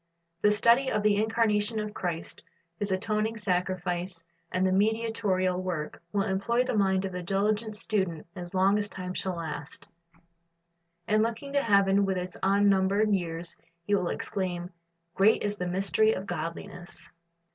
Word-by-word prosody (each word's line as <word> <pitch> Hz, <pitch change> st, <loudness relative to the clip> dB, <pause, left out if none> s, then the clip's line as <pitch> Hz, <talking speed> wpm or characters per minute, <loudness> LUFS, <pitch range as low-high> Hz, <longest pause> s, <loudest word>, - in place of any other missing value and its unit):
The 210 Hz, -, +5 dB
study 235 Hz, +5 st, +4 dB
of 210 Hz, -, 0 dB
the 210 Hz, -1 st, +4 dB
incarnation 220 Hz, -1 st, +1 dB
of 210 Hz, 0 st, -4 dB
Christ, 170 Hz, -4 st, -4 dB, 0.4 s
His 205 Hz, -1 st, -1 dB
atoning 215 Hz, +4 st, 0 dB
sacrifice 180 Hz, -3 st, -2 dB, 0.3 s
and 185 Hz, 0 st, +1 dB
mediatorial 205 Hz, -4 st, +1 dB
work, 175 Hz, -5 st, -4 dB
will 200 Hz, -1 st, +1 dB
employ 200 Hz, +5 st, +1 dB
the 255 Hz, -, -2 dB
mind 190 Hz, -2 st, +2 dB
of 190 Hz, -, -3 dB
the 180 Hz, 0 st, -4 dB
diligent 210 Hz, +4 st, 0 dB
student 190 Hz, -7 st, -1 dB
as 175 Hz, 0 st, -7 dB
long 195 Hz, +2 st, +4 dB
as 205 Hz, 0 st, -2 dB
time 180 Hz, -1 st, -6 dB
shall 185 Hz, -1 st, -2 dB
last; 150 Hz, -3 st, -6 dB, 1.2 s
and 215 Hz, +1 st, +3 dB
looking 230 Hz, +5 st, -2 dB
to 280 Hz, -, +3 dB
heaven 200 Hz, -3 st, +4 dB
with 190 Hz, -1 st, 0 dB
its 180 Hz, 0 st, -4 dB
unnumbered 200 Hz, +1 st, +3 dB
years, 170 Hz, -3 st, -1 dB, 0.3 s
he 205 Hz, -, -1 dB
will 185 Hz, -3 st, +2 dB
exclaim, 180 Hz, -3 st, -3 dB, 0.4 s
"Great 200 Hz, +4 st, +4 dB
is 205 Hz, 0 st, -1 dB
the 180 Hz, -, -2 dB
mystery 195 Hz, +4 st, +2 dB
of 190 Hz, -, -4 dB
godliness." 170 Hz, 0 st, -6 dB
195 Hz, 150 wpm, -28 LUFS, 180-210 Hz, 1.2 s, The